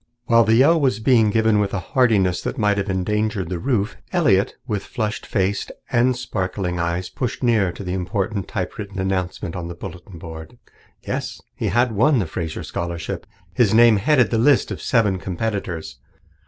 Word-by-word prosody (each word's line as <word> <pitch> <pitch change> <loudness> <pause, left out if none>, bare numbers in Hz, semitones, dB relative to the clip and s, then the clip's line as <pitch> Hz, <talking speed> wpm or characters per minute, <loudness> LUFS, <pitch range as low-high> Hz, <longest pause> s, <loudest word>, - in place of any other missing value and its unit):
While 115 -2 +5
the 110 0 +4
yell 150 +7 +5
was 130 -7 +1
being 110 -2 +4
given 110 0 +3
with 105 -1 0
a - - 0
heartiness 105 -8 +3
that - - -4
might 105 -3 +2
have 100 +1 -3
endangered 100 0 -1
the 90 -2 -3
roof, 115 -3 -1
Elliott, 115 - +2
with 105 -3 -2
flushed 110 -3 -4
face 100 -1 0 0.2
and 125 0 +3
sparkling 95 -6 -3
eyes, 85 +2 -1
pushed 125 0 -4
nearer 110 -7 +3
to 100 - -9
the 90 -1 -3
important 95 +2 -2
typewritten 100 -1 -5
announcement 95 -1 -2
on 90 -2 -4
the 85 - -7
bulletin 85 +1 -9
board. 80 +7 -9 0.5
Yes, - - -3
he - - -3
had 120 0 +2
won 130 +7 +3
the 105 - +1
Fraser 80 0 -5
Scholarship. 85 -1 -5 0.3
His 115 -5 +3
name 115 -2 +7
headed 125 +2 +3
the 115 - +2
list 135 +3 +3
of - - -5
seven 105 -6 +2
competitors. 90 - -4
105 Hz, 175 wpm, -21 LUFS, 90-115 Hz, 0.5 s, name